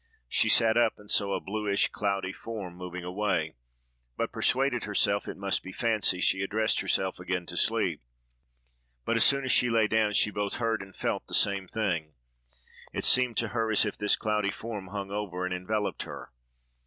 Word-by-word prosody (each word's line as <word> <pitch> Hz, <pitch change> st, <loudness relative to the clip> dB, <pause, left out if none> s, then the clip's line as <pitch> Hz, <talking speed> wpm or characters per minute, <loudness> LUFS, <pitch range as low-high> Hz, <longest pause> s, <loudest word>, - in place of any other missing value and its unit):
She -, -, +2 dB
sat 110 Hz, 0 st, +4 dB
up, 120 Hz, -2 st, +3 dB
and 105 Hz, 0 st, -12 dB
saw 100 Hz, -1 st, +2 dB
a -, -, -2 dB
bluish, 100 Hz, 0 st, 0 dB
cloudy 100 Hz, -2 st, -2 dB
form 105 Hz, -6 st, -7 dB
moving 90 Hz, 0 st, -7 dB
away; 90 Hz, -3 st, -1 dB, 0.6 s
but -, -, -2 dB
persuading 130 Hz, -2 st, +1 dB
herself 100 Hz, -1 st, 0 dB
it -, -, -6 dB
must 100 Hz, 0 st, -1 dB
be 95 Hz, -, -9 dB
fancy, 105 Hz, -4 st, +1 dB
she 95 Hz, 0 st, +2 dB
addressed 110 Hz, +3 st, +1 dB
herself 95 Hz, -1 st, 0 dB
again 90 Hz, 0 st, -3 dB
to -, -, -7 dB
sleep; -, -, +2 dB, 1.0 s
but -, -, 0 dB
as -, -, +5 dB
soon 140 Hz, -1 st, +4 dB
as 130 Hz, -, +1 dB
she 125 Hz, -, +4 dB
lay 115 Hz, -1 st, +3 dB
down, 110 Hz, -1 st, +1 dB
she 105 Hz, -, +3 dB
both 105 Hz, -1 st, -2 dB
heard 115 Hz, -3 st, -1 dB
and 95 Hz, 0 st, -12 dB
felt -, -, -2 dB
the -, -, -1 dB
same 100 Hz, -2 st, +2 dB
thing: 85 Hz, -9 st, -2 dB, 0.8 s
it -, -, -3 dB
seemed 125 Hz, -3 st, +3 dB
to 115 Hz, -, 0 dB
her 110 Hz, +1 st, -1 dB
as 110 Hz, 0 st, +4 dB
if 105 Hz, -, -3 dB
this 105 Hz, 0 st, +2 dB
cloudy 105 Hz, -2 st, -1 dB
form 105 Hz, -3 st, -6 dB
hung 100 Hz, 0 st, -6 dB
over 95 Hz, -3 st, -3 dB
and 90 Hz, -, -2 dB
enveloped 105 Hz, +3 st, -2 dB
her. -, -, -8 dB
105 Hz, 190 wpm, -28 LUFS, 95-110 Hz, 1.0 s, as